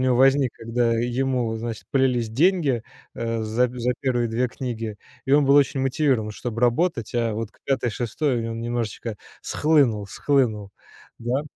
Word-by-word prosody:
него 130 -1 +2
возник, 135 -1 +4
когда 115 +1 0
ему, 120 0 0
значит, 115 -1 -5
полились 125 -4 +1
деньги, 145 - +2 0.3
а, 115 -1 -2
за 115 +3 +1
за 125 0 -1
1 120 -3 0
2 120 +2 0
книги, 115 -4 -5 0.3
и 135 - +1
он 145 0 +6
был 140 +1 +4
очень 140 -1 +4
мотивирован, 130 -4 +1
чтобы 115 +2 -5
работать. 120 - +1
А 115 -2 +1
вот 110 -1 -4
к - - -30
5-6 120 0 -1
он 115 0 -4
немножечко 115 -2 -3 0.3
схлынул, 135 -10 +2
схлынул. 110 -5 0 0.5
Да. 120 +4 -1
120 Hz, 150 wpm, -24 LUFS, 115-135 Hz, 0.5 s, он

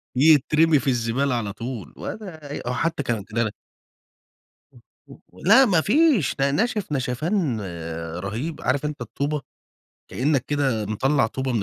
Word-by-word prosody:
يترمي 150 +2 +5
في - - -7
الزبالة 125 +2 0
على 105 -4 -3
طول، 115 - -6
ولا 160 -9 -7
أي - - -4
هو 125 - 0
حتى 160 +1 -1
كانت 110 -4 -3
إن 115 - -5
أنا 110 -2 +1 1.2
و - - -17 0.5
و 90 - -17
لا 260 +7 +7
ما 175 -7 +3
فيش، 255 - +3
ده 140 0 +1
ناشف 210 +2 -1
نشفان 140 - -1 0.6
رهيب، 115 - -4
عارف 140 +3 0
أنت 150 -1 -4
الطوبة؟ 145 +1 -2 0.7
كأنك 140 0 +1
كده 135 -7 0
مطلع 135 +4 +1
طوبة 130 +2 -3
من 110 -4 0
140 Hz, 150 wpm, -23 LUFS, 120-160 Hz, 1.2 s, لا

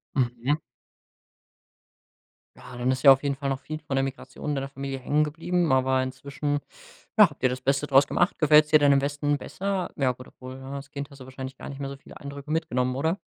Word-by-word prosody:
Mhm. 125 +3 0 2.0
Ja, 125 - -11
dann 125 +1 0
ist 130 0 -1
ja 135 - +11
auf 135 - +1
jeden 140 -2 -1
Fall 140 0 -3
noch 135 -1 -1
viel 155 +2 -6
von 145 -2 -6
der 135 - +2
Migration 135 +2 -5
in - - +1
deiner 135 0 -3
Familie 135 0 -5
hängen 145 +4 +1
geblieben. 165 +3 0
Aber 130 0 +3
inzwischen, 140 +3 -3 0.6
ja, 210 -5 +8
habt 145 - -17
ihr 130 - +5
das 125 +1 -4
Beste 135 +2 +1
draus 135 0 +5
gemacht. 175 - +1
Gefällt's 150 -1 +6
dir 155 - +7
denn 145 -1 +5
im 140 - +4
Westen 145 +1 0
besser? 195 +2 -3
Ja, 130 -3 +2
gut, 125 +1 -13
obwohl, 130 0 -10
ja, 135 +1 -9
als 140 -1 -7
Kind 140 0 -6
hast 140 -1 -15
du 130 - -9
wahrscheinlich 130 0 -7
gar - - -8
nicht 140 - -8
mehr 140 - -3
so 140 - -7
viele 135 - -14
Eindrücke 140 +1 -8
mitgenommen, 125 -5 0
oder? 160 +8 0
140 Hz, 225 wpm, -26 LUFS, 130-150 Hz, 2.0 s, ja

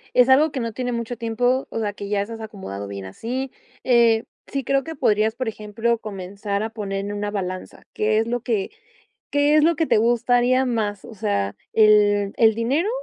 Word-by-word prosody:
es 250 +1 +6
algo 290 +4 +5
que 270 - -3
no 230 -1 -3
tiene 245 +1 -3
mucho 235 +1 -3
tiempo. 245 +3 0
O - - -4
sea, 210 -2 -2
que 200 -1 -7
ya 205 -1 +1
estás 225 +2 -8
acomodado 145 - -7
bien 100 -1 -7
así, 245 - -4 0.3
eh, 235 -3 +4 0.2
sí 275 -1 -3
creo 275 +2 +1
que 325 +3 -7
podrías, 220 -4 +2
por 255 - -3
ejemplo, 220 +2 -1
comenzar 200 0 -4
a 220 - -4
poner 195 -3 -4
en 205 +1 -4
una 205 0 -3
balanza, 185 -3 -5
¿qué 215 0 +1
es 225 - +2
lo 240 +1 -1
que 220 -5 -1 0.6
qué 290 +1 +3
es 305 - +5
lo 335 +1 +4
que 325 -1 0
te - - +3
gustaría 245 +3 +3
más? 210 -5 -2
O 225 - -10
sea, 100 - -1 0.2
¿el 205 -2 +4
el 220 -1 +5
dinero, 265 - 0
225 Hz, 205 wpm, -22 LUFS, 205-245 Hz, 0.6 s, es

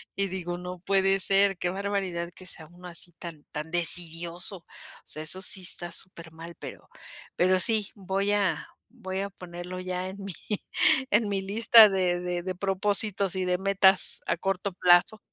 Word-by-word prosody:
y 200 0 -1
digo: 175 -2 -5
"No 180 0 -8
puede 195 0 +2
ser. 195 0 +3
Qué 175 - -2
barbaridad, 190 -3 -3
que 185 - -10
sea 160 -3 -9
uno 175 +2 -14
así 175 +1 -6
tan 165 -3 -11
tan 155 +2 -6
desidioso". 175 +2 +4
O 170 - -21 0.4
sea, 155 - -7
eso 185 +4 -2
sí 190 0 0
está 175 -1 0
súper 170 -2 -5
mal, 165 +1 -11
pero - - -11 0.5
pero 185 +1 +3
sí, 215 -1 +2
voy 195 +1 -2
a 200 -3 -1 0.3
voy 190 0 -5
a 200 +1 -3
ponerlo 180 -1 -9
ya, 185 0 -4
en 190 - -8
mi 195 - -6 0.8
en 210 +1 +2
mi 195 -1 -1
lista 220 +2 +6
de 180 -2 0
de 180 -1 -4
de 185 0 -4
propósitos, 195 0 -1
y 190 - -2
de 180 0 0
metas 195 0 +2
a - - 0
corto 195 +2 -3
plazo. 180 +4 +3
185 Hz, 175 wpm, -26 LUFS, 175-195 Hz, 0.8 s, lista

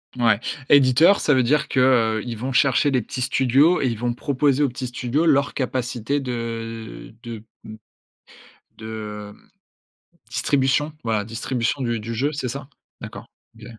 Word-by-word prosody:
Mouais, 115 -4 +3 0.3
éditeur 140 +7 +6
ça 145 - +3
veut 130 - +3
dire 140 +4 +1
que, 130 - 0 0.4
heu, - - -6
ils 120 -2 -4
vont 125 +5 -4
chercher 135 +2 +3
les 130 -3 +1
petits 130 - -6
studios, 135 +7 +3
et - - 0
ils 115 -3 -2
vont 120 +1 -1
proposer 140 +2 +1
aux - - +3
petits 125 +1 -5
studios 125 +5 -1
leur 140 -2 +3
capacité 130 0 -2
de 115 -3 -6
de 120 -2 -7
m 105 - -14 1.3
de, 105 -2 -7
hem, - - -24 0.8
distribution, 140 +3 +1
voilà 110 -3 -1
distribution 115 +3 -2
du 120 -3 -1
du 115 +2 -5
jeu, 140 +6 0
c'est 140 -4 -4
ça? 135 +2 -6 0.3
D'accord, - - -8 0.3
OK. 115 - -11
125 Hz, 160 wpm, -22 LUFS, 115-140 Hz, 1.3 s, éditeur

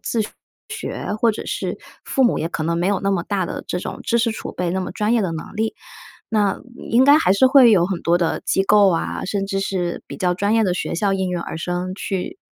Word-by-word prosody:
自 230 - -1 0.5
学， 435 - -5
或 230 -2 +4
者 - - -6
是 - - -3 0.3
父 270 - +1
母 240 - +3
也 165 - -2
可 165 - -4
能 170 +1 0
没 175 - 0
有 200 -1 +1
那 195 - 0
么 185 -4 0
大 200 -3 -1
的 - - -6
这 180 - -2
种 - - -6
知 235 - +2
识 230 0 +2
储 220 - -6
备， 180 -1 -2
那 185 - -1
么 180 - -5
专 210 +1 0
业 240 - +3
的 185 -5 -1
能 160 +6 -7
力。 220 +1 -1 0.5
那 210 -3 +1 0.2
应 235 +3 +2
该 285 +2 +7
还 185 - +3
是 200 +7 +5
会 260 -4 +7
有 180 -4 +4
很 190 -2 -3
多 170 +1 +3
的 170 -2 0
机 195 - +2
构 205 0 +5
啊， 165 - -2
甚 195 0 -2
至 195 0 -2
是 185 -3 -2
比 - - -8
较 180 -3 +1
专 200 +4 0
业 225 - +4
的 190 -4 +1
学 - - -3
校 195 +3 +1
应 190 -1 -1
运 180 - -1
而 165 - -6
生 180 +2 -3
去 195 - -4
195 Hz, 275 characters per minute, -21 LUFS, 180-220 Hz, 0.5 s, 该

